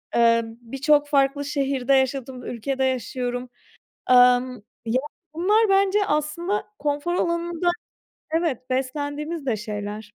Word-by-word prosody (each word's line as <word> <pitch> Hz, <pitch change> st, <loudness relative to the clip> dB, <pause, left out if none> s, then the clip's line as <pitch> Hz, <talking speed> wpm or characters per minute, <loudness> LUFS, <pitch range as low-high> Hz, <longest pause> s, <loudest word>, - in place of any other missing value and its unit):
Eee, 230 Hz, 0 st, +5 dB
birçok 270 Hz, +6 st, 0 dB
farklı 285 Hz, 0 st, +2 dB
şehirde 275 Hz, -2 st, 0 dB
yaşadım, 265 Hz, -1 st, 0 dB
ülkede 265 Hz, +3 st, -2 dB
yaşıyorum. 250 Hz, 0 st, -2 dB, 0.6 s
Amm, 250 Hz, 0 st, +5 dB, 0.3 s
ya, 235 Hz, +3 st, +1 dB, 0.3 s
bunlar 415 Hz, +6 st, +3 dB
bence 395 Hz, +1 st, +3 dB
aslında 320 Hz, +7 st, -1 dB, 0.2 s
konfor 295 Hz, +3 st, -1 dB
alanında 340 Hz, 0 st, 0 dB, 0.7 s
Evet, 305 Hz, -7 st, -1 dB
beslendiğimiz 290 Hz, +4 st, -3 dB
de 230 Hz, -4 st, +1 dB
şeyler. 210 Hz, 0 st, -5 dB
275 Hz, 105 wpm, -24 LUFS, 250-310 Hz, 0.7 s, Eee